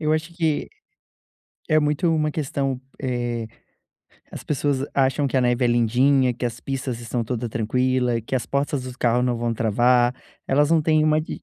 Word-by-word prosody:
Eu 155 -1 +1
acho 155 +2 -2
que 160 -3 -1 1.0
é 155 - +5
muito 150 +3 +1
uma 155 -1 0
questão, 135 -3 -2 0.2
eh, 120 -3 -2 0.9
as - - -7
pessoas 140 -1 0
acham 135 +1 +2
que 135 - -2
a - - +4
neve 125 0 +1
é - - +3
lindinha, 125 +3 +3
que 125 - -2
as 120 0 -5
pistas 130 -3 -4
estão 120 0 -3
toda 120 0 -3
tranquila, 125 +2 0
e 115 - -3
que 125 - -5
as 125 - -1
portas 140 -1 -1
do 130 0 -8
carro 120 0 +2
não 125 -1 0
vão 120 0 -1
travar, 120 +3 +3 0.3
elas 145 +3 +2
não 165 - +4
têm 155 0 +3
uma 155 0 +3
de 155 - -7
130 Hz, 190 wpm, -23 LUFS, 120-145 Hz, 1.0 s, é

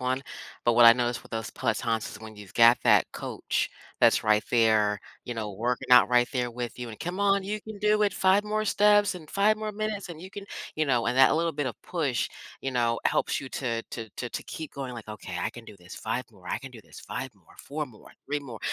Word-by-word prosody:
one. 130 +1 0 0.4
But 120 - +4
what 120 - +7
I 115 - +11
noticed 120 0 -1
with - - -17
those 115 -1 -4
pelotons 115 -2 -1
is 100 - -10
when 110 -1 -10
you've 100 -3 -12
got 115 +1 +7
that - - +4
coach - - -2 0.3
that's - - +5
right 105 0 +4
there, 110 -3 +3 0.3
you 120 - -4
know, 110 -3 -4
working 120 +5 -2
out 125 - +8
right 120 0 +4
there 125 -2 -1
with 120 -1 -5
you, 120 -1 -6
and 110 - -9
"Come 180 +3 -4
on, 200 -1 +3
you 210 +2 -3
can 220 -1 -9
do 210 +1 +3
it, 205 -2 +2
5 190 +2 +3
more 215 +1 -1
steps 205 -1 +4
and 160 -4 -10
5 210 +2 +3
more 215 0 -3
minutes 210 -1 -3
and 165 -2 -8
you 185 - -8
can" 200 +1 -8 0.3
you 155 - +1
know, 125 -4 +2
and 120 +1 0
that 135 +2 +6
little 165 0 +1
bit 145 -1 -2
of 125 - -5
push, 150 -8 -1 0.3
you 135 - -3
know, 115 -2 +1
helps - - +1
you 135 - -7
to 115 -4 -2
to 115 -2 -6
to 125 - -4
to - - -5
keep 160 -4 -7
going, 135 -3 -5
like, 115 -3 -9
"Okay, 100 -4 -7
I - - -1
can 120 - -11
do 105 - -12
this, 90 0 -11
5 120 +3 -3
more, 90 -4 -14
I - - -1
can 135 -1 -10
do 115 - -11
this, - - -14
5 - - -5
more, - - -23
4 150 +1 -4
more, 115 -5 -16 0.2
3 145 +1 -1
more," 125 -6 -9
125 Hz, 250 wpm, -27 LUFS, 115-180 Hz, 0.4 s, I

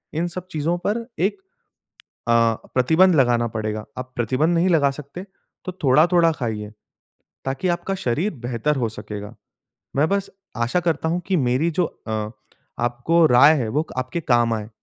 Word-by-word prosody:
इन 170 +3 0
सब 185 +1 -6
चीज़ 155 -1 -2 0.2
पर 230 +3 -1
एक 195 - +1 0.9
अ, 115 - +4 0.4
प्रतिबंध 160 +9 +4
लगाना 120 -3 +3
पड़ेगा। 110 -1 -3
आप 130 0 -7
प्रतिबंध 130 +8 +1
नहीं 170 +2 +2
लगा 145 -4 +4
सकते 150 +6 -8 0.4
तो 185 - -4
थोड़ा-थोड़ा 165 +5 +5
खाइए 110 -6 -4 0.7
ताकि 135 +8 -1
आपका 175 +2 -1
शरीर 175 - -1
बेहतर 125 +5 0
हो 120 -4 0
सकेगा। 105 -1 -7 0.6
मैं 150 +3 +3
बस 200 0 -1 0.3
आशा 120 +9 +1
करता 160 -2 -1
हूँ 175 - 0
कि 185 -2 +2
मेरी 130 +4 +1
जो 180 +3 +1
अ, 110 -5 -5 0.5
आपको 120 +8 +2
राय 140 +4 +7
है 115 - -2
वो 150 +7 0
क - - -8
आपके 130 +6 -2
काम 120 -4 +2
आए। 110 -1 -4
140 Hz, 160 wpm, -22 LUFS, 120-170 Hz, 0.9 s, राय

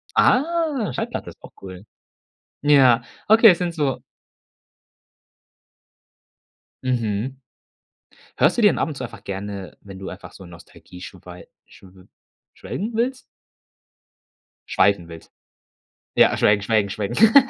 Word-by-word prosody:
Ah, 295 - +1
Schallplatte - - -4
ist - - -16
auch - - -13
cool. 95 +1 -10 0.8
Ja, 130 -5 +5 0.2
okay, 225 +2 +7
es 175 - +4
sind 175 -2 -3
so 145 -5 -1 2.8
Mhm. 125 +1 -2 0.9
Hörst 155 - +2
du - - +2
dir 205 - +7
denn - - -2
ab - - 0
und 150 - -6
zu 130 - -6
einfach 115 -4 -9
gerne, 100 -1 -7
wenn 95 -1 -12
du 95 - -7
einfach - - -11
so 95 - -13
Nostalgie 90 +1 -15
schwei 90 -1 -12 0.2
schw 95 -1 -18 0.5
schwelgen 220 +5 -6
willst? 255 +3 -1 1.5
Schweifen 100 -4 +2
willst. 80 -1 -13 0.8
Ja, - - +4
schwelgen, 105 -1 +3
schwelgen, 100 -1 +1
schwelgen. 155 - +2
115 Hz, 120 wpm, -22 LUFS, -, 2.8 s, okay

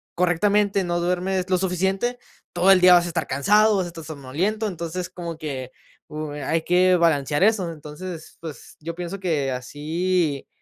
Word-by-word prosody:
correctamente, 195 +3 +2
no 175 0 -1
duermes 180 +1 -1
lo 185 - +3
suficiente, 190 +6 -1 0.3
todo 180 +2 +4
el 190 - +7
día 180 0 +7
vas 175 -1 +6
a - - -3
estar - - -2
cansado, 210 +10 +3
vas 185 - 0
a - - -5
estar 165 -2 -10
somnoliento. 165 +10 -2
Entonces, 175 0 -4
como 170 -2 -7
que, 130 -5 -5 0.4
uh, 150 0 -5
hay 150 +3 -1
que 180 +1 +4
balancear 155 -1 +2
eso. 200 -6 +2
Entonces, 160 +2 -9
pues, 155 -6 -9
yo 165 +2 -6
pienso 180 +2 -5
que 150 -8 -1
así, 150 +4 -1
175 Hz, 170 wpm, -23 LUFS, 155-185 Hz, 0.4 s, el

